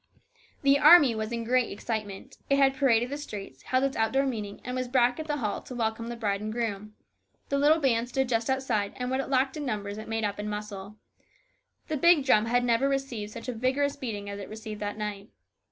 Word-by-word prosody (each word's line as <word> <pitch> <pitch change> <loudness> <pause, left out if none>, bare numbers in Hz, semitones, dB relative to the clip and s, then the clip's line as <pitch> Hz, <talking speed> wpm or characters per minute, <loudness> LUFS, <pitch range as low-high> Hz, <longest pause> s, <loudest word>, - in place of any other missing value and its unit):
The 280 0 +5
army 300 -5 +8
was 220 0 -4
in 235 -1 -2
great 250 +1 +1
excitement. 205 -1 -5
It 275 - +4
had 270 -1 +4
paraded 245 -2 +2
the 285 - -4
streets, 200 - -8
held 255 +1 0
its 275 -1 0
outdoor 265 +5 +1
meeting, 210 -6 -4
and 250 0 -4
was 255 0 -2
back 245 0 +2
at 315 - -5
the 295 -1 -1
hall 215 -7 -2
to 255 - -9
welcome 230 0 -2
the 240 - -4
bride 205 -3 -1
and 215 0 -4
groom. 215 -2 -4 0.5
The 280 - +1
little 300 +3 +5
band 245 -4 +1
stood 265 +1 0
just 230 -1 0
outside, 245 -7 0
and 250 0 -3
what 260 - 0
it 270 - -3
lacked 265 +2 +1
in 295 - -4
numbers 205 -2 -3
it 215 - -8
made 225 0 -2
up 205 0 -2
in 210 0 -3
muscle. 210 -1 -6 0.9
The 310 - -2
big 325 -1 +5
drum 215 -5 +4
had 245 +1 +2
never 245 +3 +2
received 260 -6 -3
such 230 +2 -9
a 250 - -2
vigorous 265 +5 0
beating 215 -7 -5
as 200 0 -6
it 200 - -8
received 215 -1 -7
that 205 0 -3
night. 210 -1 -5
235 Hz, 225 wpm, -28 LUFS, 210-270 Hz, 0.9 s, army